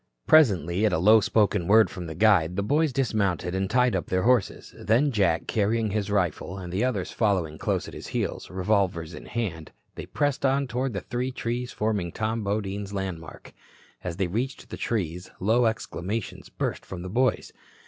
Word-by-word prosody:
Presently 100 - +4
at 100 - 0
a - - +3
low 105 +7 +6
spoken 105 -4 +1
word 110 +2 +5
from 90 -2 -6
the 80 - -6
guide 90 -4 +3
the 100 - 0
boys 150 +7 +2
dismounted 100 -9 0
and 95 0 -1
tied 125 +1 +3
up - - -2
their 95 0 0
horses. 120 -4 +1
Then, 120 +9 +2
Jack 95 -7 +1
carrying 110 0 0
his 105 -1 -1
rifle, 90 -1 -1
and 90 -2 -7
the 95 - 0
others 110 -8 -1
following 90 -8 0
close - - -1
at - - -10
his - - -8
heels, - - -3
revolvers 90 -3 0
in - - -10
hand, 95 -9 -4 0.2
they - - -8
pressed 145 -2 -1
on 135 +1 +2
toward 130 0 -2
the 100 - -3
three 125 +2 -3
trees 125 0 -3
forming 105 -5 -1
Tom 110 +3 -2
Bodine's 100 0 -3
landmark. 95 -5 -6 0.5
As 90 -2 -4
they 95 - +1
reached 120 +9 -4
the - - -4
trees, 90 -5 -3
low 115 +5 +3
exclamations 110 -1 -4
burst - - -3
from 90 -2 -8
the - - -5
boys. 125 +6 0
100 Hz, 185 wpm, -26 LUFS, 90-115 Hz, 0.5 s, low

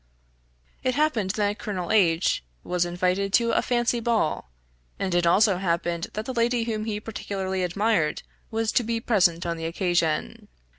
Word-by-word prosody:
It 255 - 0
happened 275 -10 +1
that 205 +1 -1
Colonel 185 -5 -4
H 170 - +3 0.2
was 180 -1 0
invited 180 +3 0
to 235 +1 +4
a - - +2
fancy 240 -1 +1
ball; 225 - 0 0.5
and 190 -2 -2
it 175 -1 +2
also 195 +2 +4
happened 170 -2 -1
that 215 +1 -4
the 260 - -4
lady 235 0 +1
whom 215 -2 -3
he 210 -2 -2
particularly 195 -3 -4
admired, 180 -3 0 0.3
was 225 -1 -1
to 245 - +2
be 230 0 -1
present 180 -8 +2
on 170 -1 -2
the 165 - -5
occasion. 165 - -1
195 Hz, 160 wpm, -25 LUFS, 175-225 Hz, 0.5 s, to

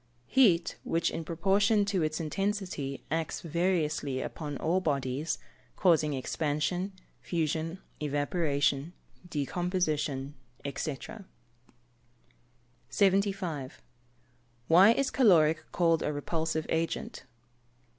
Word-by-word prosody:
_ - - -40 0.2
Heat 185 - +3
which, 165 0 0
in 165 - -4
proportion 200 +6 +2
to 200 -3 0
its 155 0 -1
intensity, 180 -5 -3
acts 160 0 -2
variously 160 -5 0
upon 145 +1 -5
all 170 +7 +1
bodies, 145 0 -1 0.4
causing 155 -5 +3
expansion, 155 +7 -1 0.3
fusion, 165 0 -2 0.2
evaporation, 145 0 0 0.4
decomposition, 150 -3 -1 0.4
&c. 140 0 -2 1.9
75. 190 -4 0 0.9
_Why 190 +7 +7
is 275 -1 0
caloric 165 - +4
called 165 -2 +2
a - - 0
repulsive 160 +2 -2
agent? 165 -4 -2
160 Hz, 90 wpm, -30 LUFS, 145-185 Hz, 1.9 s, Why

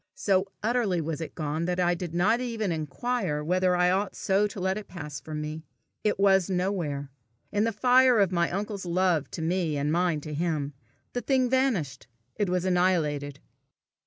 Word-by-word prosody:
So 195 -1 +1 0.2
utterly 220 -6 +1
was 160 0 -3
it 160 - -6
gone, 155 +1 -2
that 180 +1 -1
I 175 -1 +3
did 175 -1 -5
not 205 +7 +3
even 225 -6 -2
inquire 160 - -2
whether 180 +2 +2
I 180 0 +3
ought 195 +1 0
so 200 +2 +2
to 205 - -8
let 190 +1 0
it 215 0 -6
pass 150 -6 -7
from 155 -1 -6
me. 155 +1 -5 0.4
It 210 -2 +1
was 195 -2 +4
nowhere. 175 -7 -2 0.4
In 210 +1 +1
the 230 - +1
fire 250 +3 +5
of 195 -3 +3
my 170 -1 +1
uncle's 200 0 -4
love 175 -3 +1
to 160 - -5
me 165 -3 0
and 145 +1 0
mine 170 -2 +1
to 150 +1 -7
him, 150 -2 -1 0.4
the 245 - -2
thing 260 -2 +1
vanished. 200 - 0 0.3
It 205 -4 0
was 180 0 0
annihilated. 155 -6 +1
180 Hz, 185 wpm, -27 LUFS, 155-205 Hz, 0.4 s, fire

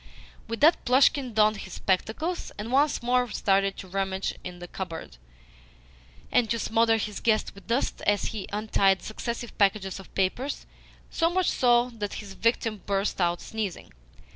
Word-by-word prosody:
With 230 0 -5
that 320 +3 +5
Plushkin 255 -1 +3
donned 215 0 +4
his 190 -2 -8
spectacles, 225 - -1
and 215 +3 -5
once 280 0 +2
more 245 0 +2
started 195 -1 +1
to 190 - -8
rummage 190 0 -2
in 180 -1 -7
the 175 0 -9
cupboard, 165 - -7 1.1
and 240 -3 +3
to 230 - +1
smother 225 0 +2
his 210 -2 -4
guest 220 -2 +1
with 200 - -15
dust 235 +4 0
as 205 -1 +3
he 210 -3 -5
untied 200 -2 +2
successive 235 +1 -5
packages 195 -1 +2
of 195 - -13
papers 245 +9 -1 0.5
so 330 -1 +2
much 370 0 +1
so 245 0 +3
that 210 -3 -5
his 200 -2 -7
victim 225 0 0
burst 195 -1 0
out 175 0 +1
sneezing. 215 -5 -5
215 Hz, 160 wpm, -27 LUFS, 195-240 Hz, 1.1 s, that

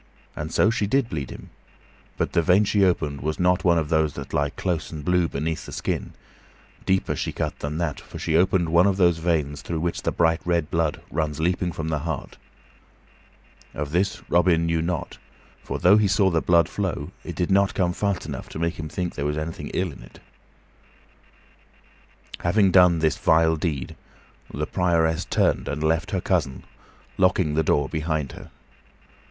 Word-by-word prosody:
And 75 +2 -5
so 110 - +3
she 105 -3 -1
did 130 +2 +1
bleed 70 -4 -4
him, - - -11 0.7
but - - -1
the 85 - +3
vein 90 +5 +4
she 100 0 +2
opened 75 -6 0
was 80 +1 -2
not 90 0 +2
one 85 -2 +4
of 80 -2 -1
those 80 -2 +2
that 70 -1 -8
lie 70 0 +1
close 85 0 -3
and 75 -3 -7
blue 90 -1 +2
beneath 80 +2 -3
the - - -8
skin; - - -3 0.7
deeper 95 0 +1
she - - -3
cut - - -4
than 75 +2 -4
that, 85 -4 -2
for - - -11
she 80 - -1
opened 90 0 +3
one 85 +4 +5
of 95 -1 +1
those 85 -3 +3
veins 75 -4 -1
through 80 +4 -4
which 85 0 -2
the - - -1
bright 80 0 +2
red 85 -3 0
blood 80 -2 -1
runs 75 -1 -2
leaping 90 +2 0
from 80 -1 -4
the 75 -1 -1
heart. 80 +2 -5 1.4
Of 75 0 -4
this 95 +5 -1
Robin 85 -1 +3
knew 85 -1 0
not; 85 -2 -3 0.4
for, - - -4
though 95 +4 +5
he 105 -1 +3
saw 95 0 +3
the 80 -1 +1
blood 85 -3 +4
flow, - - -3
it - - -7
did 90 +1 -1
not 100 0 +3
come 90 -2 +1
fast 100 -1 -1
enough 70 -4 -6
to - - -8
make 85 +1 -2
him 80 -1 -5
think 90 +1 -3
that - - -20
there 70 - -2
was 75 +1 -2
anything 80 +1 -5
ill 90 -2 -1
in - - -13
it. - - -15 2.2
Having 95 +2 +3
done 90 -2 +6
this 80 -1 +1
vile 80 0 +4
deed, 75 -5 -3 0.6
the 75 - -3
Prioress 85 -2 +1
turned - - +1
and 75 +1 -3
left 80 +2 +1
her 95 - -1
cousin, 80 -10 -1 0.6
locking 90 -4 +3
the 80 - +2
door 75 -2 +1
behind 80 -2 -2
her. - - -11
85 Hz, 190 wpm, -24 LUFS, 75-90 Hz, 2.2 s, done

